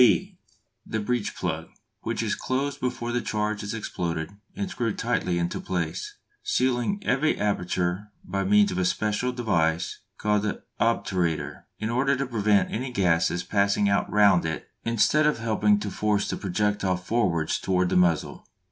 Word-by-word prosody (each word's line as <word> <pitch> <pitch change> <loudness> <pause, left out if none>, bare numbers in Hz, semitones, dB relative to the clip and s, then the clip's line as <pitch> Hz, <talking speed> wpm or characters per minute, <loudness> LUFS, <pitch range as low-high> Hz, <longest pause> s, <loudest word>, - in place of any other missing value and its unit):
(b) 185 - +4 0.4
The 110 - -3
breech 110 -1 -1
plug, 80 -2 -3 0.3
which - - -2
is - - 0
closed 135 +2 -2
before 120 -1 -2
the 120 0 0
charge 105 -1 -1
is 105 +2 -4
exploded 85 -6 -3 0.2
and 200 0 -2
screwed 120 - -2
tightly 90 -1 0
into 85 0 -1
place, 85 -4 -3 0.3
sealing 125 +8 +1
every 140 +5 +2
aperture 90 -1 -1 0.2
by 100 +1 -2
means 105 +1 +4
of 90 - -2
a 90 - +1
special 110 +6 0
device 90 -8 0 0.2
called 105 -1 +1
the 105 0 -3 0.2
"obturator," 95 -8 0
in 110 +1 -2
order 135 +3 +2
to 140 - -1
prevent 105 -4 +2
any 125 +3 -3
gases 90 -4 +2
passing 100 0 +2
out 100 - +1
round 100 -4 +5
it 80 -1 -4
instead 115 +7 +3
of 150 - +2
helping 105 -2 +2
to 100 -1 -4
force 105 0 0
the - - -2
projectile 100 -1 0
forwards 90 -5 0
towards 90 -1 +1
the - - +1
muzzle. 85 -3 +1
105 Hz, 160 wpm, -26 LUFS, 90-120 Hz, 0.4 s, round